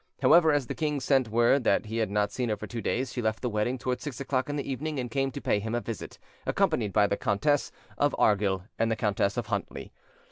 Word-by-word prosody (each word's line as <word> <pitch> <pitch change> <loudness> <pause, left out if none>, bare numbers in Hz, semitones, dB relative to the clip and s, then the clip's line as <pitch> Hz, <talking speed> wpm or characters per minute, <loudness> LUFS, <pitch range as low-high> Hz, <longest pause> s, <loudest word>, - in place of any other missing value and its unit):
However, 165 -2 +6
as 145 -3 +1
the - - -4
king 150 -2 -1
sent 130 -3 +2
word 120 +4 +3
that 100 - +2
he 110 +2 -4
had 110 -3 0
not 105 0 0
seen 125 +1 -2
her 105 - 0
for 105 - -6
two 115 +1 -5
days, 125 +2 -1
she 125 - -2
left 110 -1 -1
the 125 - -1
wedding 105 +5 0
towards 125 0 -3
six 140 -6 -5
o'clock 135 -1 -1
in 145 - -2
the 140 - -3
evening, 150 +3 -3
and 125 -2 -4
came 135 +2 0
to 130 - -6
pay 105 - +1
him 110 +3 -3
a - - +1
visit, 115 -2 -7 0.3
accompanied 105 -4 +1
by 105 +1 +4
the 100 - 0
Countess 140 +9 +1 0.3
of 145 -1 +2
Argyll 100 -3 +2 0.2
and 115 0 +2
the 115 - +1
Countess 100 -2 0
of - - -1
Huntly. - - -4
120 Hz, 250 wpm, -28 LUFS, 105-135 Hz, 0.3 s, However